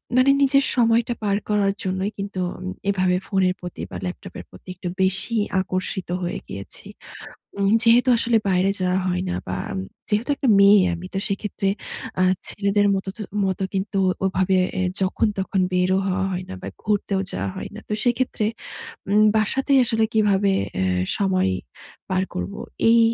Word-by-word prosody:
মানে 255 +2 +5
নিজের 275 0 +5
সময়টা 235 -1 +3
পার 200 -1 +1
করার 205 -1 +2
জন্যই, 190 +2 -1
কিন্তু 195 -1 -5 0.2
আম 185 - -9 0.2
এভাবে 185 -2 +2
ফোনের 190 -2 +2
প্রতি 180 - -7
বা - - -6
ল্যাপটপের 185 +1 -7
প্রতি - - -17
একটু 180 0 -6
বেশিই 195 +3 +2 0.2
আকর্ষিত 185 0 -3
হয়ে 180 +3 -3
গিয়েছি। 100 0 -7 0.7
উম 200 0 +2
যেহেতু 235 +2 +5
আসলে 230 0 +2
বাইরে 185 +1 +2
যাওয়া 185 0 +1
হয় 180 0 0
না, 180 - -1
বা - - -3 0.2
আম 195 - -3 0.3
যেহেতু 220 +7 0
একটা 265 - -1
মেয়ে 200 0 +7
আমি, 175 +2 -7
তো 195 - 0
সেক্ষেত্রে 200 -1 -2 0.5
আ - - +5 0.3
ছেলেদের 205 0 +1
মতো 190 0 -3
ত - - -10 0.3
মতো 190 0 -2
কিন্তু 195 +1 -1 0.3
ওভাবে 190 0 +2 0.2
এ - - 0 0.2
যখন 190 +4 +1
তখন 190 0 0
বেরও 185 +1 +2
হওয়া 190 0 0
হয় 180 0 -3
না, - - -6
বা - - -5
ঘুরতেও 205 -2 0
যাওয়া 95 +1 -2
হয় - - -6
না। 215 - -8
তো - - -4
সেক্ষেত্রে 245 -3 0 0.6
উম 210 +1 +5
বাসাতেই 270 +6 +2
আসলে 225 -2 +1
কিভাবে 205 -2 +3 0.3
এ - - +1 0.3
সময় 190 - +1 0.6
পার 185 0 +1
করবো? 90 +2 -4 0.3
এই 230 0 +6
195 Hz, 165 wpm, -23 LUFS, 185-215 Hz, 0.7 s, মেয়ে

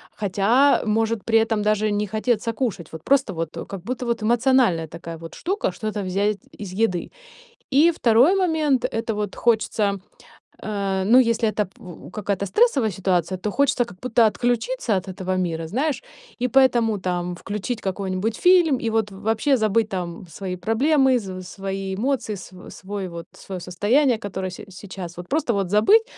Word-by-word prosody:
хотя 215 +8 +3
может 225 0 0
при 225 -1 +4
этом 220 -1 -1
даже 215 0 +1
не 205 0 0
хотеться 220 +1 -1
кушать. 215 - -3
Вот 160 -1 -9
просто 275 -7 +2
вот 165 -1 -3 0.2
как 195 -2 -6
будто 250 +4 -4
вот 235 -2 -1
эмоциональная 235 -7 +3
такая 165 +1 -8
вот 165 0 -10
штука- 380 - -1
что-то 215 -1 -3
взять 200 +3 0 0.2
из 200 -3 -6
еды. 185 -4 0 0.6
И 295 +5 +5
2 255 - +4
момент- 315 -8 +1
это 225 0 -1
вот 210 -2 -3
хочется, 215 -3 +1 0.6
э, 195 -2 -1
ну, 230 +5 +6
если 230 -2 +2
это 210 0 -1
пу 180 -2 -13
какая-то 200 -1 -2
стрессовая 265 - +2
ситуация, 185 -1 0
то 210 +3 -2
хочется 265 -1 +2
как 180 - -13
будто 235 -2 +3
отключиться 245 - 0
от 185 - -5
этого 185 0 -3
мира, 165 -3 -2
знаешь, 275 - -1 0.4
и 250 - +2
поэтому 240 -5 +3
там 180 -1 -2
включить 210 +5 -4
какой-нибудь 190 +2 -2
фильм 350 -5 +4
и 230 - -2
вот 220 -2 0
вообще 220 +7 +1
забыть 220 0 +1
там 180 -2 -5
свои 185 +2 -5
проблемы, 260 - +2
св 185 -3 -7
свои 195 0 -4
эмоции, 240 0 -1
св 185 -1 -11
свой 195 0 -5
вот 170 -1 -8
своё 190 -2 -8
состояние, 220 - +2
которое 190 -3 -4
се 180 - -9
сейчас. 185 -2 -9
Вот 175 0 -8
просто 285 -4 0
вот 200 -2 0
забыть, 395 - +5
210 Hz, 165 wpm, -23 LUFS, 190-245 Hz, 0.6 s, ну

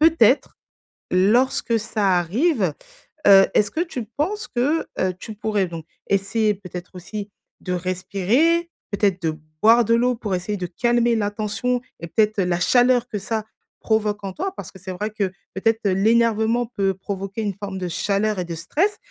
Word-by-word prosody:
peut-être, 325 +1 +4 0.5
lorsque 230 +4 +3
ça 205 -4 +1
arrive, 205 - +1 0.5
heu, 195 -1 +8
est-ce 205 -1 +3
que - - -4
tu 265 -9 -4
penses 395 +9 -1
que, 285 +7 0
heu, 185 0 +1
tu 220 - -7
pourrais 210 -2 0
donc 165 -2 -8 0.2
essayer, 210 +2 +1
peut-être 180 -2 -9
aussi, 200 +3 -7 0.3
de 180 - -3
respirer? 200 - +1 0.2
Peut-être 200 -2 +1
de 160 - +1 0.3
boire 230 +2 +6
de 230 +1 +2
l'eau 245 +1 +2
pour 210 -4 -2
essayer 195 +4 -3
de 180 -2 -3
calmer 240 +5 +2
la 205 -1 0
tension 220 +4 -1 0.2
et 170 - -6
peut-être, 215 +4 +1
heu, 190 - +2
la 175 -1 0
chaleur 245 +4 +4
que 210 - -3
ça 215 +2 -3 0.4
provoque 210 -2 0
en 195 - -3
toi? 380 - -3
Parce - - -8
que - - -13
c'est 190 +1 -7
vrai 205 +4 -3
que 210 -2 -1 0.3
peut-être, 225 +3 +1
heu, 190 - +2
l'énervement 225 +3 +2
peut 195 -5 0
provoquer 195 +2 -5
une 205 -3 -2
forme 200 -2 -6
de 180 - -3
chaleur 200 +4 0
et 180 - -2
de 170 - -5
stress. 320 - 0
210 Hz, 180 wpm, -22 LUFS, 190-235 Hz, 0.5 s, heu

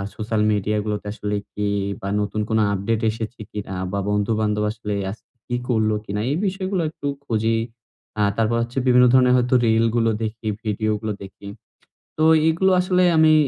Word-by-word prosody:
Social 110 0 -1
media 105 +1 0
গুলোতে 105 -1 -3
আসলে 105 -1 -3 0.2
কি? 105 0 -2 0.3
বা 100 - -5
নতুন 105 +1 -2
কোন 110 - +2 0.2
আপডেট 105 +3 -1
এসেছে 115 +1 -6
কিনা, 100 -2 -5 0.2
বা 100 - -1
বন্ধুবান্ধব 105 0 0
আসলে 105 -1 -5 0.2
আজকে 110 - -13 0.2
কি 120 - -2
করলো 110 -3 +2
কিনা, 105 +1 -3
এই 150 - 0
বিষয়গুলো 190 -1 -2
একটু 145 -2 -6 0.2
খুঁজি। 115 -2 +1 0.6
আ - - +3 0.2
তারপর 115 +1 +1
হচ্ছে 120 +2 -8
বিভিন্ন 125 0 +6
ধরনের 125 -1 +5
হয়তো 125 +1 +2
রিলগুলো 115 +1 +2
দেখি, 110 0 -5 0.2
ভিডিওগুলো 110 0 -1
দেখি। 100 +1 -12 0.7
তো 155 - +1 0.3
এগুলো 190 +4 +2
আসলে 180 0 +2
আমি 155 0 +6
110 Hz, 160 wpm, -22 LUFS, 105-125 Hz, 0.7 s, বিভিন্ন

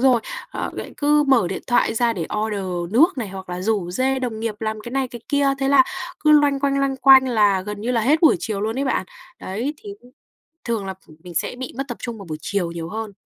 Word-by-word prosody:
rồi. 255 -2 +4 0.3
Ờ, - - -4
vậy - - -7
cứ 295 0 +3
mở 235 -9 +4
điện 190 - -5
thoại 240 -2 +2
ra 235 0 +2
để 170 -6 -4
order 190 -5 -3
nước 320 +11 +5
này, 220 -5 -3
hoặc 190 -1 -9
là 180 0 -4
rủ 200 -4 0
rê 260 +7 0
đồng 235 -4 -4
nghiệp 225 -2 -2
làm 220 -1 -3
cái 240 +2 -8
này, 270 -1 0
cái 240 -1 -9
kia, 285 -1 +2
thế 270 0 0
là 275 -2 +6 0.4
cứ 305 - +3
loanh 290 -2 +4
quanh, 275 0 +1
loanh 275 -1 0
quanh, 265 0 +7
là 205 -5 +3
gần 210 +1 -6
như 235 +4 -2
là 235 - +2
hết 290 +8 +3
buổi 320 - +6
chiều 210 -3 -3
luôn 220 +5 -2
ấy 280 - 0
bạn. 250 -8 -1 0.3
Đấy, 235 +10 -3
thì, 410 - -9
ưm, 250 +1 -20 0.5
thường 225 -4 -2
là 190 - -3
ph 190 - -27
mình 175 -2 -10
sẽ 165 - -1
bị 255 +1 -7
mất 275 +1 -3
tập 240 - -6
trung 235 -3 -5
vào 200 - -10
buổi 155 -3 -5
chiều 180 -1 -2
nhiều 165 -1 -6
hơn. 220 +1 -5
230 Hz, 260 wpm, -22 LUFS, 200-270 Hz, 0.5 s, quanh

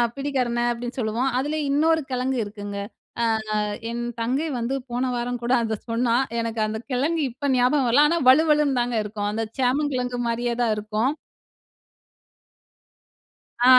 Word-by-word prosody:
பிடிகரணை 255 -4 -1
அப்டின்னு 240 +2 -5
சொல்லுவோம். 235 +4 0
அதுல 295 +4 -1
இன்னொரு 320 +3 +3
கெழங்கு 255 +1 0
இருக்குங்க, 205 -1 -7 0.5
அ - - +3 0.7
என் 240 0 -3 0.2
தங்கை 265 +8 0
வந்து 235 +3 -1 0.2
போன 250 +1 -1
வாரம் 245 0 -2
கூட 240 +2 0
அத 220 -2 -2
சொன்னா. 235 0 +1 0.3
எனக்கு 230 -1 -2
அந்த 220 +1 -3
கெழங்கு 305 +6 +1
இப்ப 280 +2 -2
ஞாபகம் 250 +2 +3
வரல, 285 +5 +6
ஆனா 340 +1 +2
வழுவழுன்னு 300 -2 +4
தாங்க 240 -1 -1
இருக்கும். 205 0 -3
அந்த 225 +1 -1
சேமங்கிழங்கு 250 -2 0
மாரியே 235 +1 -1
தான் 220 -2 +2
இருக்கும். 215 +6 0 2.5
ஆ, - - +4
245 Hz, 140 wpm, -24 LUFS, 230-275 Hz, 2.5 s, வரல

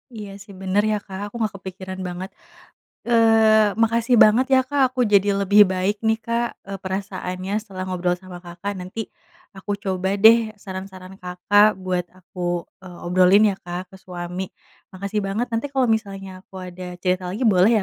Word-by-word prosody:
Iya, 210 -2 -7
sih, 200 - -14
bener, 190 +2 +2
ya, 210 - +1
Kak. 195 +1 -6
Aku 220 - -17
nggak 215 -3 -1
kepikiran 190 0 -7
banget. 180 +2 -6 0.8
Eee, 220 -2 +5
makasih 230 +2 +2
banget 230 +5 +4
ya, 260 - +6
Kak, 285 -1 0
aku 255 0 -4
jadi 200 0 +5
lebih 200 +1 +5
baik 190 +3 0
nih, 220 - +3
Kak, 235 +1 0 0.2
eee, 195 - -5
perasaannya 190 -1 -4
setelah 190 -3 -7
ngobrol 180 -1 -1
sama 180 -1 -11
Kakak. 175 +4 -5
Nanti 185 +5 -6 0.6
aku 190 +2 -8
coba 190 0 -1
deh 220 +3 +8 0.3
saran-saran 190 -1 -8
Kakak 200 +3 +3
buat 180 -1 -1
aku, 185 0 -13 0.4
eee, 180 -2 -11
obrolin 185 +4 +5
ya, 190 - -8
Kak, 180 +2 -6
ke - - -11
suami. 180 +1 -5 0.4
Makasih 200 +3 -3
banget, 215 +5 -1
nanti 230 +4 -1
kalau 265 -1 +2
misalnya 195 -3 -8
aku 190 0 -16
ada 180 0 -8
cerita 180 -1 0
lagi 210 +8 -3
boleh 200 +1 +5
190 Hz, 170 wpm, -22 LUFS, 185-215 Hz, 0.8 s, deh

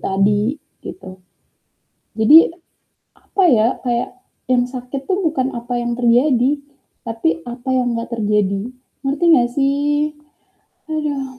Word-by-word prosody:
tadi 205 +7 +1 0.3
gitu. 280 - -9 1.1
Jadi 255 +9 +8 0.8
apa 390 - -2
ya, 225 -3 +4 0.2
kayak, 240 -1 -1 0.4
yang 245 -1 +4
sakit 255 +1 -6
tuh 375 - +1
bukan 270 -5 0
apa 240 +1 -6
yang 240 0 -2
terjadi, 245 +2 +3 0.6
tapi 165 -8 -1
apa 245 +2 -7
yang 245 -2 0
nggak 230 +1 -5
terjadi, 205 -3 0 0.4
ngerti 280 +5 -2
nggak 240 -5 +4
sih? 290 +2 +1 0.8
Haduh. 280 -4 -3
245 Hz, 115 wpm, -19 LUFS, 230-280 Hz, 1.1 s, Jadi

